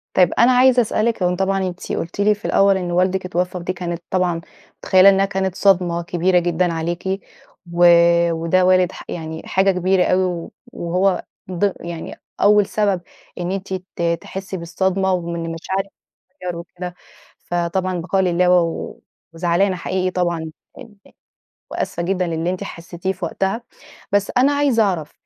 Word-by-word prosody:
طيب، 180 -2 +4
أنا 240 +2 +6
عايزة 255 0 +5
أسألِك 220 -2 0
هو 180 0 +2
طبعًا 190 0 0
أنتِ 180 0 -7
قُلتِ 170 +4 -4
لي 210 +1 +4
في 205 - -14
الأول 195 -1 +4
إن 180 -2 -3
والدِك 185 +1 +1
اتوفّى، 180 0 -2
ودي 180 +1 -3
كانت 175 -1 -5
طبعًا 180 -2 0 0.4
متخيّلة 190 +1 +6
إنها 195 0 +3
كانت 190 -1 -2
صدمة 180 -3 +2
كبيرة 180 +1 +2
جدًا 175 0 0
عليكِ 175 +4 -2 0.5
و 175 +1 +4 0.5
وده 165 +3 +1
والد 185 -1 +4
ح - - -10
يعني 160 -1 -5
حاجة 195 +1 +2
كبيرة 185 0 +2
أوي 185 +1 +2
و 175 -2 -3 0.3
وهو 180 +3 0 0.3
ض 190 +2 0
يعني 170 -1 -7 0.3
أول 205 0 +5
سبب 200 -4 0 0.4
إن 175 +1 -2
أنتِ 195 0 -4
ت 185 -1 -7 0.2
تحسّي 190 0 -6
بالصدمة، 190 +3 0
ومن 170 -2 -3
المشاعر 170 +4 -3 0.5
تتغيّر 180 -11 -6
وكده، 180 +1 -8 0.4
فطبعًا- 175 +2 -2
البقاء 185 +3 0
لله- 180 0 +2
و 180 -2 +5
و 165 - -6 0.3
وزعلانة 175 +3 +1
حقيقي 185 +1 -2
طبعًا 170 -3 -2 0.3
إن 230 -5 -12 0.8
وآسفة 170 - -3
جدًا 180 0 0
للي 165 +1 -1
أنتِ 185 - -4
حسّتيه 175 +2 -5
في 185 -1 -7
وقتها. 195 +7 -2 0.5
بس 200 -1 +1
أنا 275 +3 +4
عايزة 285 -5 +2
أعرف 175 -7 -1
185 Hz, 160 wpm, -20 LUFS, 175-195 Hz, 0.8 s, أنا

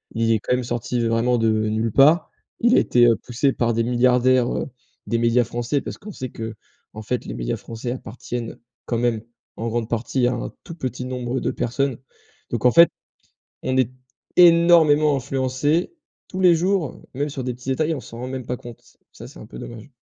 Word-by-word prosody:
Il 115 0 +1
est 110 - +3
quand 115 - -1
même 125 - -2
sorti 120 0 -2
vraiment 115 +2 +2
de 115 -1 +2
nulle 110 +1 0
part, 150 - +4 0.3
il 240 +2 +5
a - - +7
été, 120 -1 +4
heu, 115 - +4
poussé 130 +3 0
par 120 -2 0
des 115 +1 +1
milliardaires, 125 +1 +3
heu, - - -3 0.4
des 115 - 0
médias 120 +1 +3
français 120 +4 -2
parce - - -7
qu'on 210 0 -10
sait 130 -5 -6
qu'en 110 -1 -10
fait, 125 +3 -3
les - - -5
médias - - -3
français 115 +1 -6
appartiennent, 120 -1 -6 0.3
quand 120 - -1
même, 115 -2 0 0.4
en 115 - -3
grande 115 0 -2
partie, 120 +2 0
à 125 - +1
un 120 - -5
tout 170 - -9
petit 130 -5 -4
nombre 125 0 -3
de - - -1
personnes 130 +1 -1 0.5
donc 120 -3 -2
en 125 - +7
fait, 170 +4 +7 0.7
on 130 - -1
est 130 -2 +2 0.4
énormément 165 -4 +6
influencés, 135 - 0 0.4
tous 185 - -6
les 180 -2 +7
jours, 180 -1 -1
même 145 +2 -1
sur 135 -2 -5
des 125 -1 -3
petits 125 +2 -8
détails. 155 +4 0
On 140 - -5
s'en 115 - -11
rend 125 - -5
même 130 -1 -5
pas 125 - -2
compte. 120 -1 -11 0.3
Ça, - - -11
c'est - - -14
un - - -11
peu - - -11
dommage. 115 - -9
125 Hz, 205 wpm, -22 LUFS, 115-140 Hz, 0.7 s, a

